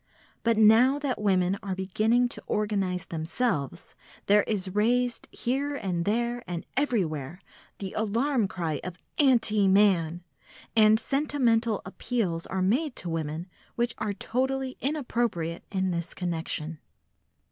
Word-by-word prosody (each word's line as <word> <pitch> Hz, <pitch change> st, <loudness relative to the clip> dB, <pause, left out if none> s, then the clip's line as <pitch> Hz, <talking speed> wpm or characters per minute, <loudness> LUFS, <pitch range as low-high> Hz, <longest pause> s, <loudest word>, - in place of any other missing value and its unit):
But 230 Hz, -1 st, +2 dB
now 225 Hz, +6 st, +6 dB
that 280 Hz, -6 st, -2 dB
women 190 Hz, -1 st, +2 dB
are 195 Hz, -2 st, -3 dB
beginning 215 Hz, +6 st, +2 dB
to -, -, -6 dB
organise 195 Hz, -4 st, -1 dB
themselves, 165 Hz, -, -2 dB, 0.3 s
there 205 Hz, +1 st, +5 dB
is 190 Hz, -4 st, -2 dB
raised 240 Hz, +4 st, +1 dB
here 280 Hz, +4 st, -1 dB
and 180 Hz, -8 st, -2 dB
there 235 Hz, +3 st, 0 dB
and 175 Hz, 0 st, -4 dB
everywhere 175 Hz, -, -1 dB, 0.4 s
the 195 Hz, -2 st, -6 dB
alarm 225 Hz, +2 st, +1 dB
cry 165 Hz, -6 st, -3 dB
of 180 Hz, -1 st, -6 dB, 0.2 s
"Anti 230 Hz, -7 st, +4 dB
man!" 180 Hz, -4 st, +3 dB, 0.5 s
and 215 Hz, 0 st, +6 dB
sentimental 240 Hz, -5 st, +1 dB
appeals 185 Hz, -4 st, -2 dB
are 190 Hz, 0 st, -1 dB
made 255 Hz, -, +1 dB
to 175 Hz, -, -4 dB
women 160 Hz, +1 st, -3 dB, 0.3 s
which 240 Hz, 0 st, +1 dB
are 215 Hz, -1 st, -1 dB
totally 260 Hz, +5 st, -2 dB
inappropriate 235 Hz, -, -1 dB
in 190 Hz, -1 st, 0 dB
this 170 Hz, -1 st, -4 dB
connection. 165 Hz, -3 st, -3 dB
210 Hz, 125 wpm, -27 LUFS, 180-240 Hz, 0.5 s, now